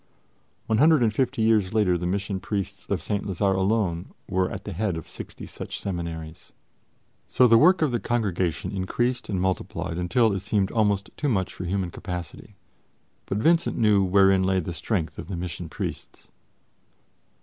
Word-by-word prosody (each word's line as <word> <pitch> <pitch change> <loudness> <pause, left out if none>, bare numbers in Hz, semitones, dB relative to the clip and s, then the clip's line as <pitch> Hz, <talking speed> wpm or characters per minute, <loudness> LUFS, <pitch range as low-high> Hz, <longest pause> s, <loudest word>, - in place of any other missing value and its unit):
One 110 0 +1
hundred 155 -2 +5
and 110 -2 +2
fifty 115 -2 0
years 110 -3 +2
later 100 -5 +3
the 85 0 -2
Mission 100 +1 -2
Priests 100 0 -4
of 90 -6 -2
St. 100 +2 -1
Lazare 95 0 0
alone 95 -3 0 0.2
were 95 0 +1
at - - -6
the - - -6
head 95 -1 -1
of 80 - -8
sixty - - -9
such - - -7
seminaries. 85 -4 -6 0.7
So 125 - +4
the 115 -1 +6
work 180 +1 +5
of 150 - +2
the 120 - 0
Congregation 95 -9 -1
increased 120 +6 -1
and 95 -3 -1
multiplied 90 -2 -2
until 110 +5 +2
it 95 - -1
seemed 95 0 0
almost 105 -3 +1
too 150 - 0
much 95 -6 0
for 90 - -6
human 90 0 -1
capacity. 90 -3 -7 0.7
But 100 - -1
Vincent 165 +9 +2
knew 105 -3 +4
wherein 95 0 +4
lay 95 0 +2
the 85 0 -4
strength 85 -2 -2
of - - -7
the 95 -2 -4
Mission 85 -1 -5
Priests. - - -7
95 Hz, 170 wpm, -25 LUFS, 90-110 Hz, 0.7 s, the